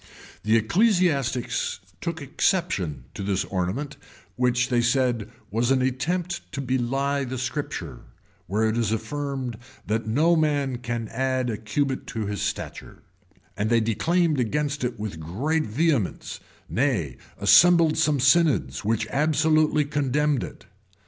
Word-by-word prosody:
[] - - -21
The 110 +1 +3
ecclesiastics 140 - +1 0.2
took 165 -2 -4
exception 140 - 0
at - - -5
this 100 -1 0
ornament, 100 +10 -3 0.4
which, 125 +1 +1
they 120 -1 +2
said, 120 -3 +1 0.2
was 115 +3 +1
an 130 -1 +3
attempt 175 +8 -2
to 140 - -4
bely 135 +2 0
the 130 0 -4
Scripture, 125 - -4 0.5
where 110 +4 +1
it 110 +1 0
is 110 -2 0
affirmed, 130 +1 -3 0.3
that 110 +2 -1
no 155 +10 +3
man 145 -5 0
can 120 -2 -3
add 130 0 -1
a 110 - -3
cubit 135 +5 -2
to 110 -3 -3
his 100 -2 -3
stature; - - -5 0.5
and 105 +1 -1
they 115 0 +4
declaimed 155 - +1
against 145 +4 -1
it 125 -3 -2
with 105 -6 -5
great 135 - -1
vehemence, 135 - -1 0.3
nay, 110 - 0 0.2
assembled 160 - +6
some 150 -3 +2
synods, 135 - +3
who 110 +2 0
absolutely 155 0 +2
condemned 145 -1 0
it. - - -9
130 Hz, 135 wpm, -25 LUFS, 110-150 Hz, 0.5 s, assembled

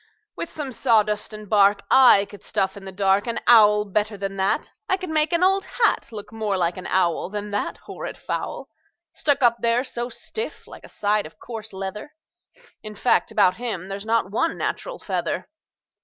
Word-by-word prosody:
"With 335 - -5
some 290 -4 -5
sawdust 215 -4 +1
and 215 -1 -9
bark 200 -1 +4
I 250 -7 +7
could 205 0 -13
stuff 190 -2 -1
in 200 -1 -10
the 190 - -6
dark 195 +2 +2
An 235 - -1
owl 210 -3 +6
better 210 +1 -1
than 195 0 -4
that. 190 +1 0 0.2
I 380 - +3
could 370 -3 -6
make 310 +1 +2
an 340 +1 +2
old 385 +1 +3
hat 450 - 0
Look 210 -1 -9
more 215 -3 -1
like 175 -1 0
an 185 - -6
owl 180 -2 +1
Than 210 0 -5
that 205 - -2
horrid - - -8
fowl, - - -4 0.5
Stuck 285 -3 +1
up 235 -1 +5
there 235 +1 +2
so 240 -2 -4
stiff 440 - -6
like - - -13
a - - -12
side 210 -3 0
of 155 - -19
coarse 220 -2 -7
leather. 195 +8 -7 0.7
In 215 -1 -9
fact, 245 - +2
about 190 -4 +3
him 215 -6 -4
there's 195 0 -5
not 225 -3 0
one 330 +10 0
natural - - -3
feather." - - -3
210 Hz, 190 wpm, -23 LUFS, 200-245 Hz, 0.7 s, I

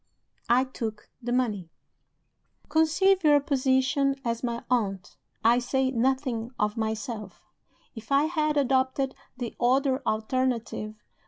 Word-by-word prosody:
I 245 +2 +5
took 225 -5 -6
the 240 0 -4
money. 215 -9 0 1.0
"Conceive 335 +5 +3
your 295 -2 +6
position 270 0 +1
as 230 -1 -1
my 235 -1 -2
aunt 200 -7 -1 0.3
(I 235 +2 +5
say 260 +1 0
nothing 255 -2 0
of 210 0 0
myself), 220 -2 -4 0.5
if 225 0 -11
I 275 +1 +5
had 305 -2 0
adopted 265 0 +1 0.2
the 245 -2 -5
other 265 +2 +2
alternative. 225 -1 -1
255 Hz, 115 wpm, -27 LUFS, 225-275 Hz, 1.0 s, your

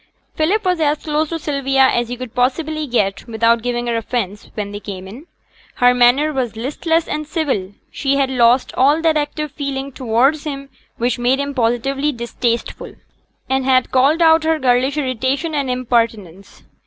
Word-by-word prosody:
Philip 380 +7 0
was 360 -2 +1
as 300 -1 0
close 305 0 -1
to 330 - -2
Sylvia 275 -3 +2
as 240 -2 0
he 245 - -4
could 255 -2 -8
possibly 300 +5 -1
get 205 -5 -1
without 230 0 +2
giving 240 0 -2
her 235 -1 -1
offence, 220 -3 -3
when 205 -1 -4
they 205 - -6
came 190 -3 -8
in. 250 - -11 0.5
Her 245 0 +4
manner 250 +5 +3
was 250 -4 -2
listless 320 +7 -1
and 305 0 -4
civil; 265 - -2 0.2
she 275 -1 0
had 275 -1 +1
lost 245 0 +3
all 285 +4 +3
that 320 -1 +3
active 300 0 -2
feeling 275 -1 -4
towards 260 +4 +1
him 275 -2 -6 0.3
which 240 0 -1
made 250 +3 +2
him 280 0 -3
positively 270 +4 0
distasteful, 235 -1 -3 0.5
and 265 0 0
had 255 -1 +2
called 280 +6 +3
out 320 0 +5
her 320 0 +2
girlish 260 +1 +1
irritation 270 +4 -1
and 280 -3 -1
impertinence. 230 -7 -2
260 Hz, 170 wpm, -18 LUFS, 240-295 Hz, 0.5 s, out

